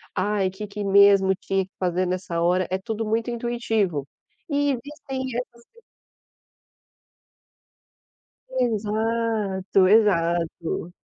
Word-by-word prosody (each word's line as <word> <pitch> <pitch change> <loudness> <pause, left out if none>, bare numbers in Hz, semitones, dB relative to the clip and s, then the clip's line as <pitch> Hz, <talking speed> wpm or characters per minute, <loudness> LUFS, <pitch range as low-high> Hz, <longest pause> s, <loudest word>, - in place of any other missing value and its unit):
Ai 200 -1 +1
que 205 +3 -7
que 205 +1 -6
mesmo 200 -1 +5
tinha 195 0 -1
que 190 - -29
fazer 185 0 0
nessa 180 -2 -2
hora 180 +1 +2
é 185 - 0
tudo 220 +3 -4
muito 225 +2 -1
intuitivo 225 - -1 0.4
e 285 0 +1
existem 270 +1 -5
es 235 -1 -6 2.9
Exato, 220 - 0
exato. 170 -5 +1
205 Hz, 100 wpm, -24 LUFS, 185-230 Hz, 2.9 s, mesmo